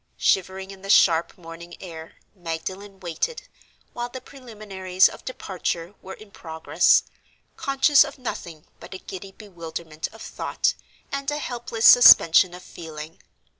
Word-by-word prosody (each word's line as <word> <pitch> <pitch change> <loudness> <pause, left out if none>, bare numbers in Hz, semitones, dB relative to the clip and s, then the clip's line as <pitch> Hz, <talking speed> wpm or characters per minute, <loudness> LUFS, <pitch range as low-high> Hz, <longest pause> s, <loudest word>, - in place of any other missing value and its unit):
Shivering 190 +1 0
in 195 -1 -13
the 195 - -10
sharp 170 -4 +4
morning 170 0 -11
air, 165 -3 -10 0.2
Magdalen 190 +3 -7
waited, 180 - -4 0.5
while 240 0 -4
the 260 - -8
preliminaries 210 -8 -1
of - - -11
departure 180 -6 -4
were 190 - -9
in 215 -2 -16
progress, 160 -3 +2 0.5
conscious 275 +1 +4
of - - -9
nothing 170 - -7
but - - -10
a - - -5
giddy 190 +1 -9
bewilderment 170 -6 -7
of 225 - -12
thought, - - -2 0.4
and 275 0 -3
a 295 - -2
helpless 240 -5 -4
suspension 180 -7 +8
of 180 - -12
feeling. 160 -2 -10
190 Hz, 135 wpm, -23 LUFS, 170-225 Hz, 0.5 s, suspension